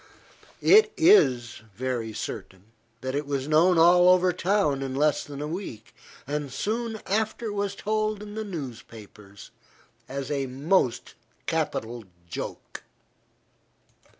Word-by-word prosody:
It 430 +1 +6
is 130 - +4
very 120 -1 -3
certain, 100 -1 -7 0.3
that 130 +1 -3
it 145 +1 -2
was 140 -1 -2
known 165 +4 +4
all 175 +2 +6
over 185 0 +4
town 170 -8 +1
in 135 -1 -4
less 150 +2 +2
than 145 0 -7
a - - -3
week, 155 - -7 0.3
and 145 -1 -3
soon 220 - -3
after 220 +2 -1
was 200 -1 -2
told 215 0 -1
in 205 0 -9
the 220 +1 -4
newspapers, 115 - -9 0.6
as 135 +1 -4
a 140 -2 -1
most 130 -3 0 0.3
capital 115 0 -2 0.2
joke. 85 - -7
150 Hz, 125 wpm, -26 LUFS, 125-200 Hz, 0.6 s, It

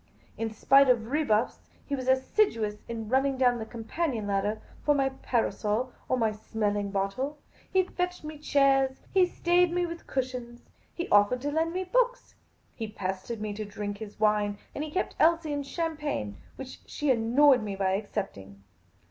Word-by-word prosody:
In 225 0 -2
spite 275 +5 +5
of 235 -1 +2
rebuffs, 255 -8 0 0.2
he 285 - -2
was 255 -1 -5
assiduous 260 - +2
in 225 -2 -5
running 265 +3 +2
down 245 -2 +3
the 220 - -5
companion 235 +1 -3
ladder 205 +2 0 0.2
for 295 - +3
my 270 -1 +2
parasol 245 -2 -1 0.2
or 255 - +2
my 225 -3 +2
smelling 210 -1 -2
bottle; 200 +9 -2 0.3
he 375 0 +4
fetched 360 -1 -3
me 305 -1 -7
chairs; 275 -2 +2
he 375 -2 +5
stayed 350 0 +2
me 355 0 +1
with 335 0 -7
cushions; 250 -2 -4 0.3
he 345 - -4
offered 205 +5 +4
to 290 +2 -2
lend 320 +2 +1
me 370 +2 -2
books; - - 0 0.4
he 225 - -5
pestered 200 +2 -4
me 210 -1 -3
to 215 +1 -4
drink 205 0 -5
his 215 -2 -9
wine; 210 -1 +2 0.2
and 290 - -3
he 310 - -5
kept 370 +5 -2
Elsie 330 -2 +3
in 285 - -1
champagne, 295 - -3 0.2
which 265 -1 -9
she 295 -2 0
annoyed 250 +3 +5
me 205 -2 -4
by 190 -1 +1
accept 200 - -3
ing. 100 +1 -14
250 Hz, 175 wpm, -28 LUFS, 210-295 Hz, 0.4 s, spite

